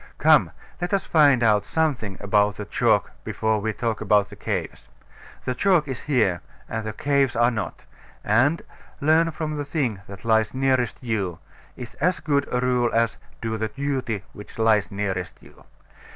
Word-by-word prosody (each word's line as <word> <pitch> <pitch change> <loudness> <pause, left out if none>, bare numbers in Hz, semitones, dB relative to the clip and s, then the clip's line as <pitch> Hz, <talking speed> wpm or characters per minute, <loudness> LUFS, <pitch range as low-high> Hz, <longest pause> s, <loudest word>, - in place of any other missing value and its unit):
Come, - - +5 0.3
let 175 +3 0
us 195 - -2
find 145 -6 +4
out 105 -2 +4
something 125 - -1
about 105 0 +2
the 105 - -6
chalk - - +1
before 110 -1 0
we 110 +1 -1
talk 110 +1 -3
about 105 -1 +2
the - - -9
caves. - - -4 0.6
The 125 - 0
chalk 175 0 +2
is 130 -3 -5
here, 120 -12 +1 0.3
and 110 -1 -4
the - - -2
caves 140 +2 +1
are 120 +1 +3
not; 110 -2 -5 0.4
and 130 +10 +2 0.4
"Learn 160 +3 +3
from 155 -1 -4
the 145 - -2
thing 140 - -2
that 100 +2 -11
lies 110 +1 +2
nearest 130 -3 +1
you" 100 -8 -2 0.4
is 120 -2 -8 0.2
as 185 - -4
good 140 -2 0
a 125 - 0
rule 125 -1 +2
as 115 -1 +1 0.2
"Do 110 -1 -2
the 110 0 -1
duty 130 -6 -3
which 105 - -12
lies 110 -3 +3
nearest 95 -3 -3
you." - - -19
115 Hz, 170 wpm, -24 LUFS, 105-140 Hz, 0.6 s, Come